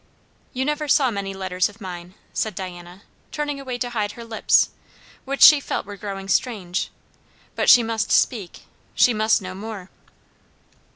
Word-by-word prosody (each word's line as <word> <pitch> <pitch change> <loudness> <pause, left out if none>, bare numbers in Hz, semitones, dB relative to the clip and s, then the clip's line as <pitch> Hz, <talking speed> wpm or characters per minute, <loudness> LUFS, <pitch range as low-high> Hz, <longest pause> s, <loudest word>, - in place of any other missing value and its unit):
"You 260 0 -2
never 300 +1 -2
saw 270 -3 +3
many 200 -2 -4
letters 185 -1 -1
of 205 +2 -17
mine," 180 -2 -8 0.2
said 215 -4 -2
Diana, 180 0 -8 0.3
turning 295 -2 -3
away 255 -3 -5
to 245 0 -3
hide 210 -3 -2
her 235 - -10
lips, 225 -1 +2 0.5
which 275 +1 +1
she 300 -1 +10
felt 275 - -4
were 205 0 -8
growing 195 -1 -7
strange. 195 -4 -1 0.7
But - - +1
she 240 - +8
must 225 -1 -2
speak; 205 -8 +1 0.3
she 245 - +5
must 215 -1 +2
know 185 0 -6
more. 200 -1 -8
215 Hz, 160 wpm, -22 LUFS, 190-245 Hz, 0.7 s, she